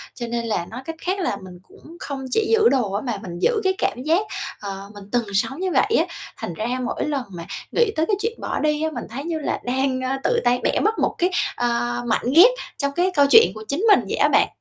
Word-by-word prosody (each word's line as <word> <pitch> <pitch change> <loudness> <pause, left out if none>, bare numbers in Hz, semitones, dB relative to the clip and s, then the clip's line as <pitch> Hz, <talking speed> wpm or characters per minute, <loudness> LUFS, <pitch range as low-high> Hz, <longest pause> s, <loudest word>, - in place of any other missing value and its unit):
Cho 240 - -5
nên 235 0 -2
là, 210 -6 -1
nói 250 +7 -8
cách 325 - -5
khác 375 +2 -1
là, 340 - -1
mình 180 -1 -11
cũng 330 +3 -15
không 275 -2 -5
chỉ 435 +7 +2
giữ 450 0 +5
đồ 245 -7 +1
á, 205 - -1
mà 235 -6 -3
mình 175 -1 -7
giữ 455 -3 +2
cái 380 0 +2
cảm 250 - -1
giác, 335 +7 +2 0.3
ờ, 200 0 -7
mình 205 -1 -10
từng 240 -2 +1
sống 265 - 0
như 375 -1 -1
vậy 435 - +3
á. - - +2 0.3
Thành 170 - -5
ra 215 +6 -3 0.2
mỗi - - -2
lần 285 -4 -1
mà 170 -1 -7 0.3
nghĩ 470 -3 +2
tới 315 - +2
cái 410 - +1
chuyện 455 +2 -2
bỏ - - -2
đi 300 0 +1
á, 315 - +1
mình - - -5
thấy 270 +5 -6
như 330 -2 -2
là 300 - -2
đang, 260 +1 0
ờ, 260 +1 -1
tự - - +2
tay 245 0 +3
bẻ - - +1
mất 440 +1 +1
một - - +1
cái, 360 +2 +1 0.2
ờ, 240 0 -1
mảnh 225 - 0
ghép 410 +10 +9 0.3
trong 280 -1 -1
cái 355 +6 +1
câu 285 - +6
chuyện 455 +6 +7
của 215 - -8
chính 320 +10 -1
mình 410 - +7
vậy - - -2
á - - +4
bạn. - - +4
270 Hz, 265 wpm, -22 LUFS, 235-355 Hz, 0.3 s, ghép